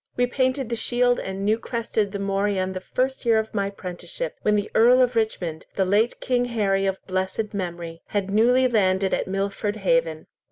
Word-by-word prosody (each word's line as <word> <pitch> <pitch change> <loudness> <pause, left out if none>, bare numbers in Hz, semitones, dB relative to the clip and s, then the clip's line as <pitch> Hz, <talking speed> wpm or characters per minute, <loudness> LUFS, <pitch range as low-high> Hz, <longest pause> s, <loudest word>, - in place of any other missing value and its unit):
We 245 - +3
painted 260 0 0
the 235 - -1
shield 245 +1 +1
and 190 +1 -4
new 215 +2 +2
crested 225 -4 -2
the 200 - -3
morion 195 -1 0
the 185 - -4
first 260 +6 -2
year 230 -2 +4
of 220 0 -2
my 200 -2 0
prenticeship, 200 - -6
when 210 - +2
the 205 0 -1
Earl 245 +3 +6
of 250 -1 +3
Richmond, 180 -8 -2
the 190 - +2
late 210 +5 +2
King 245 -1 +1
Harry 200 -5 0
of 190 0 -1
blessed 190 +3 -2
memory, 170 -3 -5
had 200 -2 -2
newly 245 +5 +4
landed 195 -4 +2
at - - 0
Milford 200 +2 -2
Haven." - - 0
210 Hz, 190 wpm, -24 LUFS, 195-240 Hz, -, Earl